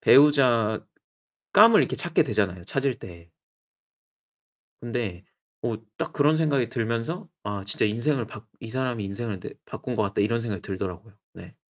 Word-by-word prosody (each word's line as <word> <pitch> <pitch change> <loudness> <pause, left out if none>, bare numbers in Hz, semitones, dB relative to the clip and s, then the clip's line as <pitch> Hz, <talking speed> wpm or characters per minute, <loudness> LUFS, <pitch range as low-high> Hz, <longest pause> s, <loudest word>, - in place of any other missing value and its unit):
배우자감을 125 -7 +4 0.8
이렇게 - - 0
찾게 - - +2
되잖아요, 95 -4 0
찾을 135 +5 -1
때. 85 -1 -12 1.5
근데 115 -6 -4 0.4
뭐 115 -2 -1 0.2
딱 - - -3
그런 150 +2 +3
생각이 140 -7 +2
들면서 120 - -2
'아 100 -1 -4
진짜 100 - 0
인생을 120 +4 0
바 110 0 -11
이 115 - -8
사람이 125 -3 -2
인생을 100 0 -4
내 - - -7
바꾼 125 - -6
것 110 - +2
같다.' 100 -1 -1
이런 115 +3 +2
생각이 105 -6 -4
들더라고요. 95 +2 -5 0.2
네. - - -13
115 Hz, 310 characters per minute, -26 LUFS, 100-130 Hz, 1.5 s, 배우자감을